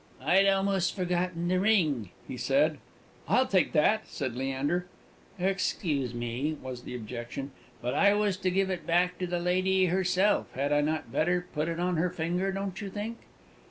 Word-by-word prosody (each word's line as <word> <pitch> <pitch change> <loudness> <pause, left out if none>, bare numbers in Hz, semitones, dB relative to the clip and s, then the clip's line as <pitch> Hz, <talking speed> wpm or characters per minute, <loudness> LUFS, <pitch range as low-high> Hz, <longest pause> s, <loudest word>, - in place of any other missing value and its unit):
"I'd 195 +2 +4
almost 195 -2 +2
forgotten 180 -2 -1
the 180 +1 +2
ring," 160 - +2 0.2
he - - -5
said. - - +2 0.5
"I'll 260 - +4
take 190 -6 +2
that!" 210 +8 +3
said 130 -5 -4
Leander. 135 +7 -1 0.5
"Excuse 165 - -1
me," 120 +6 -2
was 130 -2 -7
the 125 - -6
objection, 120 +4 -6 0.3
"but 125 +1 -1
I 200 +7 +4
was 205 -2 +1
to 185 0 0
give 190 +1 +1
it 180 - -4
back 180 +1 +2
to 180 - -1
the 175 0 -1
lady 185 +2 +2
herself. 185 +3 +2
Had 140 +3 0
I 145 - +4
not 155 +1 -2
better 175 +2 +1
put 150 +2 -1
it 170 0 -3
on 180 -1 0
her 175 +3 +2
finger, 175 +3 -1
don't 195 0 -4
you 200 - -4
think?" 215 +4 -5
180 Hz, 175 wpm, -29 LUFS, 145-190 Hz, 0.5 s, I'd